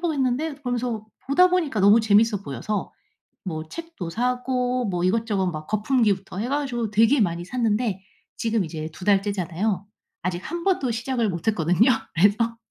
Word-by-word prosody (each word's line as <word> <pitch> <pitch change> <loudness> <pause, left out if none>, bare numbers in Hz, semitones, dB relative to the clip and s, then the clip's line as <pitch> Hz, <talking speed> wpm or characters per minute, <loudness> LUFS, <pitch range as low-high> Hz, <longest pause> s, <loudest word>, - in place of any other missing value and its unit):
보겠는데?' 290 -2 0
그러면서 245 -5 -3 0.2
보다 360 +7 +5
보니까 330 -11 0
너무 205 +4 +6
재밌어 215 -1 +3
보여서 165 - -4 0.5
뭐 160 -4 -5
책도 330 - -7
사고 250 +2 0
뭐 180 -3 -1
이것저것 205 -1 +1
막 155 -2 -5
거품기부터 210 -4 0
해 230 +5 -2
가지고 255 -6 -1
되게 225 +5 +4
많이 175 -3 0
샀는데 220 -1 0 0.4
지금 225 -3 0
이제 155 -1 -5
2 180 - -10
달째잖아요. 200 0 0 0.4
아직 175 0 -1
1 340 +1 -4
번도 350 -10 +1
시작을 235 -1 -1
못 170 +4 -3
했거든요. 185 - +3 0.2
그래서 210 +6 +3
220 Hz, 340 characters per minute, -24 LUFS, 190-250 Hz, 0.5 s, 너무